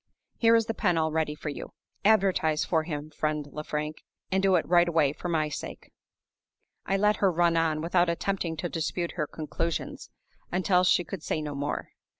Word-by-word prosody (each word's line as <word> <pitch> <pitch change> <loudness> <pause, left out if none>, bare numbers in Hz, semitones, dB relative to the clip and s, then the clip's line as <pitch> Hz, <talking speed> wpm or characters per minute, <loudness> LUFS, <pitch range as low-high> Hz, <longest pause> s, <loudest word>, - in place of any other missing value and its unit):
Here 230 -1 +5
is 225 -1 +3
the 225 - -2
pen 180 -6 +1
all 160 -1 +1
ready 155 -1 0
for 150 - -5
you. 145 - -7 0.3
Advertise 190 -7 +3
for 160 -2 +2
him, 150 -2 -5
friend 150 -1 -2
Lefrank; 150 0 -4 0.3
and 190 0 +2
do 195 -1 +4
it 170 - +1
right 175 0 +5
away, 155 -4 +2
for 175 - -5
my 155 -2 +1
sake!" 150 - -7 1.0
I 195 - +2
let 210 +1 +3
her 195 -2 +3
run 170 0 +2
on, 160 -2 +1
without 175 +1 +2
attempting 170 -1 -2
to 165 - -2
dispute 170 +1 -2
her 155 -4 -2
conclusions, 165 +2 -4 0.4
until 180 0 +3
she 180 -1 +4
could 190 -1 -7
say 155 - -2
no 150 -1 -4
more. 145 +1 -3
165 Hz, 185 wpm, -28 LUFS, 155-185 Hz, 1.0 s, Here